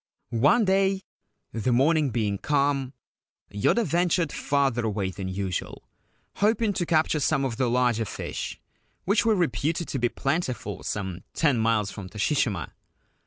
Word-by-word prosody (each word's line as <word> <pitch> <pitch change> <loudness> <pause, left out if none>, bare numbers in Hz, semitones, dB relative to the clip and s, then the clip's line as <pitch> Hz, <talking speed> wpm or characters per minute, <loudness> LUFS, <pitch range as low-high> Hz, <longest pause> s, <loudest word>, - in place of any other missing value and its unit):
One 215 +8 +4
day, 195 0 +2 0.5
the 115 +2 0
morning 145 +4 +3
being 105 -4 -1
calm, 140 -2 0 0.6
Yoda 215 - +2
ventured 175 -2 +1
farther 135 -4 0
away 100 -3 -1
than 95 0 -6
usual, 95 -1 -4 0.5
hoping 215 0 +2
to 175 -3 -2
capture 160 -1 +2
some 140 -1 +1
of 120 -4 -3
the 130 -2 +1
larger 120 -2 +2
fish - - -5 0.5
which 210 +4 +2
were 220 - +4
reputed 165 0 0
to 135 - -2
be 120 0 +2
plentiful 130 - -2
some 95 -3 -4
ten 145 -7 +2
miles 110 -2 +1
from 95 -3 -8
Toshishima. 105 - 0
135 Hz, 140 wpm, -26 LUFS, 110-165 Hz, 0.6 s, One